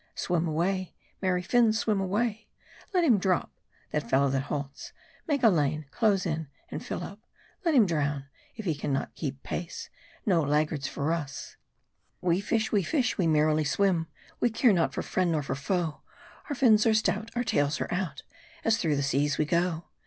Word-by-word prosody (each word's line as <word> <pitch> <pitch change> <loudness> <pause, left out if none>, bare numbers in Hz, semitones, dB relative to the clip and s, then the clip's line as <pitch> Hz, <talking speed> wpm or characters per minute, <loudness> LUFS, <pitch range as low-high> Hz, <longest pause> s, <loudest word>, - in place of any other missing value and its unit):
Swim 175 -1 0
away; 180 +4 -1 0.3
merry 180 -2 +1
fins, 225 +2 +3
swim 215 -3 +1
away! 210 +3 -1 0.4
Let 365 -3 +2
him 245 -11 +5
drop, 185 -1 0 0.4
that 150 -6 -2
fellow 135 +2 +3
that 135 0 +1
halts; 140 -1 -5 0.3
make 285 -5 0
a - - +8
lane; 155 -3 +1
close 205 -5 +2
in, 160 -2 -2 0.2
and - - -5
fill - - -4
up. 200 - -8 0.5
Let 330 -3 +3
him 235 -5 +7
drown, 145 -5 -1 0.3
if 220 - -7
he 165 - +1
can 145 0 -3
not 135 - -2
keep 135 -3 -5
pace. 170 0 -5 0.3
No 180 -6 +3
laggards 150 -1 0
for 145 +3 -2
us: 145 -4 -5 0.6
We 180 +1 +1
fish, 220 +1 0
we 205 - +3
fish, 250 - 0
we 175 - +3
merrily 155 0 +3
Swim, 170 +2 +1 0.3
We 240 - +3
care 230 0 +4
not 170 -3 +2
for - - -3
friend 180 -2 0
nor 150 -2 0
for - - -2
foe. 160 +3 -2 0.5
Our 290 - -1
fins 230 -5 +5
are 220 - +4
stout, 220 0 0
Our 245 - +1
tails 150 -11 +1
are - - -3
out, 175 -7 -3 0.4
As 225 0 +4
through 155 -3 +1
the 140 - 0
seas 140 +2 +1
we 155 - +2
go. 170 +1 0
175 Hz, 190 wpm, -28 LUFS, 150-215 Hz, 0.6 s, a